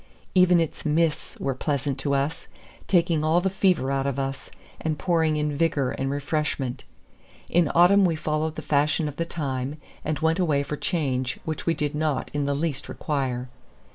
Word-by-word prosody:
Even 180 -1 +5
its 165 -2 -2
mists 155 0 0
were 135 - -1
pleasant 140 0 -2
to 140 0 0
us, 140 +3 -2 0.4
taking 170 -4 +3
all 160 +2 +4
the 190 +1 0
fever 180 -8 +2
out 135 0 0
of 140 -1 -2
us, 135 -1 -3 0.3
and 155 -1 -1
pouring 160 0 +2
in 150 -1 -1
vigor 145 -4 +1
and 135 0 -2
refreshment. 140 -2 -2 0.6
In 170 -3 +3
autumn 185 +4 +6
we 170 -3 +3
followed 155 0 -1
the - - -6
fashion 150 +2 +2
of 145 - -6
the 170 - 0
time, 140 -4 -3 0.3
and 155 -1 -1
went 160 +3 +1
away 150 -6 +2
for 145 +2 -4
change 135 -6 -1
which 160 +1 -4
we 165 - +3
did 150 -1 -1
not 150 -3 -1
in 145 -1 0
the 140 - +1
least 150 -2 -2
require. 130 -4 -2
150 Hz, 180 wpm, -25 LUFS, 140-165 Hz, 0.6 s, autumn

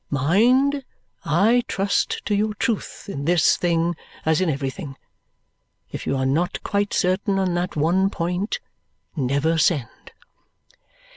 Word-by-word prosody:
Mind, 245 - +3 0.4
I 200 +10 +3
trust 200 +1 -1
to - - 0
your 210 +1 0
truth, 220 0 -3
in 140 -8 -5
this 175 0 +4
thing 170 0 0 0.3
as 160 +2 +2
in 185 - +1
everything. 140 +1 -4 1.0
If - - -6
you 135 - 0
are 130 - 0
not 155 +7 0
quite 205 0 -1
certain 190 +2 +1
on 190 -2 0
that 175 +1 -2
one 175 +6 +2
point, 180 +2 -2 0.6
never 140 +3 +1
send!" 150 -7 -1
175 Hz, 130 wpm, -23 LUFS, 155-200 Hz, 1.0 s, this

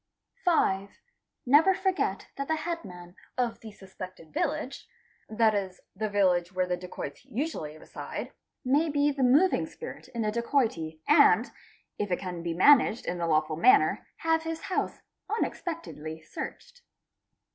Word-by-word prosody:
5. 200 - +2 0.5
Never 305 +9 +6
forget 380 -1 -1
that 275 0 -4
the 320 - +1
headman 190 - -6 0.2
of 245 -2 -1
the 220 - -10
suspected 185 -5 -11
village, 270 - -2 0.4
that 220 0 +3
is 190 -3 -3 0.2
the 215 +2 -2
village 180 -3 +2
where 185 -1 0
the 180 0 -1
dacoits 180 +6 -7
usually 245 - -4
reside, - - -7 0.3
may 290 +5 +3
be 290 0 +2
the 275 -1 -4
moving 285 +9 +4
spirit 475 - -9
in 235 -3 -3
a 210 - +1
dacoity 215 - -1
and, 295 -1 +5 0.5
if 205 - -1
it 180 - +1
can 180 -2 -5
be 170 -1 -3
managed 245 - +5
in 175 -1 -3
a 170 - 0
lawful 155 -1 +1
manner, 390 - +4
have 325 0 +1
his 325 0 -4
house 370 - -2 0.3
unexpectedly 325 - -4
searched. 485 - -8
220 Hz, 145 wpm, -28 LUFS, -, 0.5 s, Never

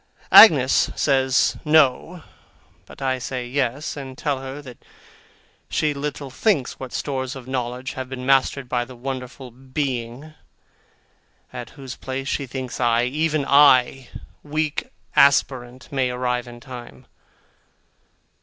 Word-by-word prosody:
Agnes 135 - +7
says 135 -2 +2
'No,' 155 +2 +2 0.6
but - - -10
I 130 -1 0
say 125 0 -5
'Yes,' 135 +2 -2
and 135 -2 -8
tell 145 -3 -1
her 135 +1 -7
that 130 -4 -13 0.9
she 150 -1 0
little 140 -1 -5
thinks 160 - 0
what 130 -2 -7
stores 130 -1 -3
of 130 -2 -10
knowledge 125 0 -4
have 130 -2 -6
been 130 -1 -6
mastered 135 0 +2
by 120 -1 -1
the 130 +1 -12
wonderful 130 0 -7
Being, 130 +2 -5 1.2
at - - -7
whose 135 -2 -8
place 135 +1 -5
she 140 -1 -2
thinks 130 0 -6
I, 120 -1 +2
even 150 +3 0
I, 135 -2 +4 0.3
weak 150 0 -3 0.3
aspirant, 130 -2 +2
may 130 -2 0
arrive 125 0 -2
in 120 0 -11
time. 125 -3 -11
130 Hz, 125 wpm, -22 LUFS, 125-140 Hz, 1.2 s, Agnes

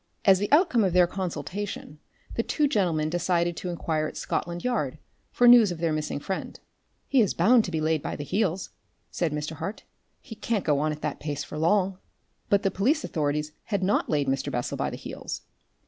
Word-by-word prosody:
As 190 -2 +6
the 205 - -2
outcome 290 - +4
of 185 -3 +1
their 180 -1 +6
consultation 180 -2 -5 0.3
the - - 0
two 295 +5 +1
gentlemen 175 - +1
decided 175 +1 0
to 180 - -4
inquire 160 -3 -1
at - - -8
Scotland 175 0 -3
Yard 155 - -1 0.3
for 245 - +4
news 240 -5 +8
of 175 - -4
their 165 -1 0
missing 155 -2 -2
friend. 190 +6 -5 0.5
"He 270 -3 +4
is 205 - +1
bound 225 +7 +5
to 180 - -5
be 160 - -1
laid 155 -1 +1
by - - -4
the 145 - -5
heels," 185 +3 -1 0.4
said 170 -3 -1
Mr. 150 +1 -4
Hart. 195 +7 -5 0.4
"He 245 - -10
can't 215 -1 -2
go 145 -3 +2
on 155 +1 +1
at 150 0 -7
that 150 - -2
pace 145 -2 -3
for 150 - -7
long." 190 +2 +2 0.5
But 200 +1 +3
the 195 - +2
police 275 - +1
authorities 150 -1 -1
had 200 -3 -1
not 195 +3 +1
laid 145 -2 +1
Mr. 135 +1 -1
Bessel 120 -1 -2
by - - -1
the - - -6
heels. - - -6
175 Hz, 205 wpm, -26 LUFS, 155-205 Hz, 0.5 s, news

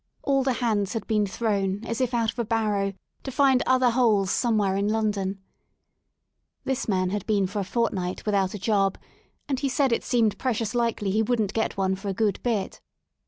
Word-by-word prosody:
All 275 -1 +2
the 260 -1 +1
hands 215 -5 0
had 225 - -3
been 210 -2 +1
thrown 200 0 -1
as 230 +2 -3
if 250 -2 +1
out 230 -3 +1
of - - -11
a - - +2
barrow 210 -3 0 0.3
to - - -6
find 265 -1 +4
other 255 -1 +4
holes 215 -6 +2
somewhere 215 -5 +1
in 200 +1 0
London* 205 -3 -1 1.2
This 265 0 -2
man 185 -3 +1
had 205 -1 -2
been 205 -3 +2
for 200 +3 -3
a - - 0
fortnight 185 -4 -2
without 200 -2 +1
a - - -3
job, 195 -1 +1 0.5
and 270 -3 -1
he 275 - 0
said 270 0 +1
it 230 - +1
seemed 230 -4 +1
precious 225 -4 -1
likely 230 -4 0
he 215 +3 +2
wouldn't 220 -3 0
get 220 -3 -1
one 190 -1 +1
for 195 +2 -8
a 195 - -2
good 210 -2 0
bit. 220 -6 -2
215 Hz, 200 wpm, -25 LUFS, 195-240 Hz, 1.2 s, find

